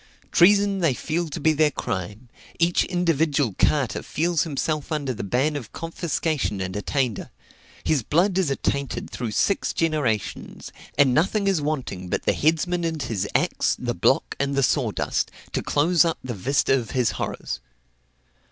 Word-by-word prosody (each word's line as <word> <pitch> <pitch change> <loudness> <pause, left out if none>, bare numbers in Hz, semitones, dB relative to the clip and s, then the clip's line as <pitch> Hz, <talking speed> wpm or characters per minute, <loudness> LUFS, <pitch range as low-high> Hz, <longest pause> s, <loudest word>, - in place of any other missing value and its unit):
Treason 200 +2 +5
they 165 -8 +2
feel 170 +6 -2
to - - -5
be 160 +2 +3
their 155 0 +3
crime; 105 -2 -5 0.3
each 170 +1 +2
individual 160 - +1
carter 135 -9 +2
feels 165 0 0
himself 155 -1 -2
under 145 -4 -1
the 115 - -5
ban 130 +9 +1
of 125 -7 -6
confiscation 160 - -2
and 95 0 -4
attainder: 120 +2 -1 0.5
his 150 -4 +2
blood 175 - +2
is 180 -6 +1
attainted 140 0 -2
through 120 -2 -4
six 195 - +1
generations, 150 -10 -2 0.3
and 140 -3 +5
nothing 195 - +2
is 195 -5 +2
wanting 130 -12 -3
but - - -1
the - - +2
headsman 165 +3 +1
and 160 -3 -2
his 100 -3 -2
axe, - - +1
the - - -2
block - - +1
and 140 0 0
the 140 - +2
sawdust, - - 0 0.2
to - - -1
close 165 +3 +3
up 165 -1 0
the 130 -2 -4
vista 135 +7 +1
of 115 -3 -7
his 125 -3 +2
horrors. 65 - -4
145 Hz, 160 wpm, -24 LUFS, 125-165 Hz, 0.5 s, Treason